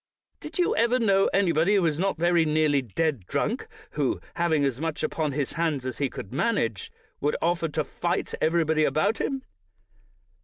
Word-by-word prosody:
Did - - -8
you 355 - +2
ever 235 +2 +3
know 195 -5 +3
anybody 185 0 +2
who 195 - +3
was 160 -2 0
not 195 -1 0
very 170 0 +3
nearly 155 -2 +2
dead 130 - -2
drunk, - - -1 0.2
who, - - -1
having 160 -4 +1
as 135 0 -2
much 160 -1 -3
upon 155 -2 -1
his 140 -1 -2
hands 160 -6 -1
as 130 -2 -4
he 140 -2 +1
could 100 - -8
manage, 130 - -1 0.3
would 150 - 0
offer 170 0 +1
to 155 0 -1
fight 175 +4 -2
everybody 160 -1 +2
about 200 +9 +1
him 270 -1 -2
160 Hz, 170 wpm, -26 LUFS, 145-175 Hz, 0.3 s, ever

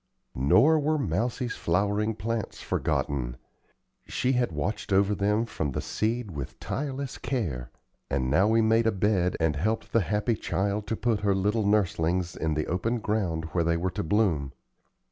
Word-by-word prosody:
Nor 115 - +4
were 155 +1 +1
Mousie's 120 - -1
flowering 105 +5 0
plants 110 +1 -3
forgotten. 60 -4 -1 0.7
She 130 - 0
had 125 -5 +1
watched 95 +9 -3
over 100 +2 +4
them 105 +3 +1
from 75 - -3
the - - -2
seed 110 -1 -2
with 70 -5 -6
tireless 135 -1 -4
care, 75 - -2 0.4
and 70 -2 0
now 85 +10 +4
we 115 +1 +4
made 115 +1 +3
a - - +4
bed 95 -3 +1
and 80 -2 +1
helped 110 +9 -1
the 115 - +4
happy 105 +4 0
child 100 0 -1
to 115 - -1
put 115 -2 0
her 100 -1 +2
little 105 +2 +1
nurslings 90 -4 +1
in 80 -1 -1
the 75 - 0
open 110 +7 -1
ground 100 -8 -1
where 85 0 +1
they 85 0 +1
were 90 +2 -1
to - - -3
bloom. 80 -8 +1
100 Hz, 165 wpm, -27 LUFS, 85-115 Hz, 0.7 s, Nor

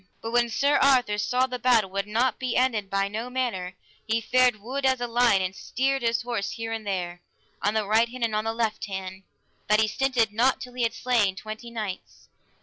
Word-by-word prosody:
But 225 - -5
when 240 0 +2
Sir 280 +6 +2
Arthur 250 -7 +3
saw 250 +5 +2
the 250 -1 -5
battle 230 -5 +3
would 200 +1 -2
not 235 +3 +1
be 255 -3 -1
ended 230 -6 +1
by 195 0 +1
no 220 +4 -5
manner, 230 -8 -2 0.3
he 225 +1 +1
fared 250 +1 +3
wood 260 +6 -5
as 260 -1 +3
a 245 - -1
lion, 235 -5 +3
and 185 +1 -3
steered 270 +6 -1
his 235 0 0
horse 230 -5 -2
here 225 +1 -5
and 220 -2 -5
there, 175 -2 -3 0.4
on 205 +2 0
the 215 -1 +1
right 220 +3 +3
hand, 250 0 -6
and 225 -2 0
on 215 +1 -1
the 225 - 0
left 225 -2 -2
hand, 190 -1 -6 0.5
that 210 +1 +4
he 220 - +3
stinted 230 -1 +1
not 245 +5 +2
till 250 -1 -9
he 250 - -4
had 230 -1 0
slain 230 -7 +1
twenty 215 +3 -8
knights. 215 -5 -7
225 Hz, 220 wpm, -26 LUFS, 210-250 Hz, 0.5 s, that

